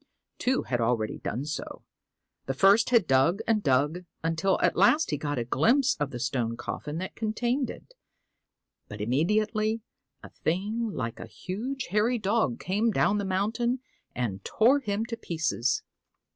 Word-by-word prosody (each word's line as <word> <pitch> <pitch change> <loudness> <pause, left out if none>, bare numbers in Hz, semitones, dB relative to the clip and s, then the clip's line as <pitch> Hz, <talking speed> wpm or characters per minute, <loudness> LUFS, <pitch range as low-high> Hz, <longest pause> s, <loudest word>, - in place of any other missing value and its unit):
Two 260 +1 +1
had 120 -2 -1
already 115 -2 0
done 125 +6 -3
so. 155 - -6 0.6
The 135 - -1
first 200 +9 +5
had 235 -6 +4
dug 155 +9 +3
and 220 -2 +2
dug 150 +5 +1 0.2
until 165 +4 +1
at - - +2
last 295 - +4
he - - +1
got 145 -1 -3
a 120 - -1
glimpse 245 - +3
of 145 -1 0
the 125 - -6
stone 120 -2 -1
coffin 150 +5 -5
that 185 +2 -5
contained 240 +4 -1
it, - - -10 0.9
but 105 - -9
immediately 215 - +1 0.4
a - - -10
thing 210 +7 -2
like 115 - -4
a - - -7
huge 245 +8 -5
hairy 220 +4 +2
dog 210 - 0
came 210 +5 +1
down 210 -1 +2
the 200 - -2
mountain 220 +6 0 0.4
and 100 -6 -3
tore 250 +6 +3
him 215 -4 -2
to 230 0 -4
pieces. 160 - -1
190 Hz, 160 wpm, -28 LUFS, 135-225 Hz, 0.9 s, first